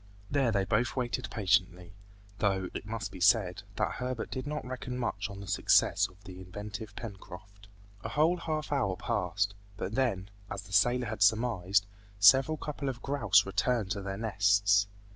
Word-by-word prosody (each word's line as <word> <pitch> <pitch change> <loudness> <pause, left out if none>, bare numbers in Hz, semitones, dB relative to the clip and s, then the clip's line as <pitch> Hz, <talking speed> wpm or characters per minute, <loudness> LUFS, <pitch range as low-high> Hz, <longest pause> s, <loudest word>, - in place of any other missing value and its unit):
There 135 -4 +2
they 100 -3 +1
both 110 +4 0
waited 125 -1 -2
patiently; 95 -3 0 0.5
though, 95 -3 0
it 105 - -6
must 115 +1 -4
be 95 - -9
said, 95 -3 +3
that - - 0
Herbert 125 -2 -4
did 130 +2 -4
not 150 -2 -4
reckon 125 0 -5
much 120 -2 -2
on 100 0 -8
the 100 - -9
success - - +3
of 95 +2 -22
the 95 -2 -10
inventive 105 +3 -8
Pencroft. 100 -1 -10 0.4
A - - -4
whole 160 +5 +2
half 155 -3 -3
hour 110 -10 +1
passed, 100 +4 -1 0.2
but 100 - -4
then, 105 -7 -1 0.2
as 100 0 -5
the 95 0 -12
sailor 120 +5 +3
had 110 -2 -5
surmised, 100 -2 +3 0.3
several 135 +10 +6
couple 145 -2 -4
of 120 -3 -7
grouse 110 -8 +3
returned 105 +1 0
to 100 -1 -2
their 95 0 -5
nests. 100 -1 +3
105 Hz, 170 wpm, -30 LUFS, 95-125 Hz, 0.5 s, several